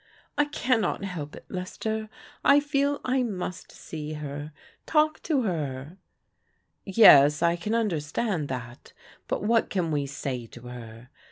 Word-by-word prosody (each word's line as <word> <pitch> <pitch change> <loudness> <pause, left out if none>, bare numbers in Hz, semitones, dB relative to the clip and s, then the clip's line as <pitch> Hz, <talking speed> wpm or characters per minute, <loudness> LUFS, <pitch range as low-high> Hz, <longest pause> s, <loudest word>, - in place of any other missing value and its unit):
" - - -33
I 295 - +5
cannot 250 -8 0
help 165 -7 -5
it, - - -12
Lester. 215 +4 -4 0.3
I 280 +1 +7
fed 285 0 +1
I 255 +1 +2
must 185 -6 -4
see 155 -1 -7
her 145 0 -6 0.2
— - - -33
^talk 310 0 +2
to 290 -6 +1
her." 155 - -3 0.4
" - - -45 0.2
Yes, 150 -7 +7
I 170 0 +4
can 210 +6 -2
understand 175 -3 -1
that, 120 -2 -7 0.3
but - - -2
what 225 +2 +2
can 175 -4 -1
we 145 -2 0
say 130 -4 -4
to 120 - -13
her? 120 -1 -10
175 Hz, 155 wpm, -27 LUFS, 145-230 Hz, 0.4 s, I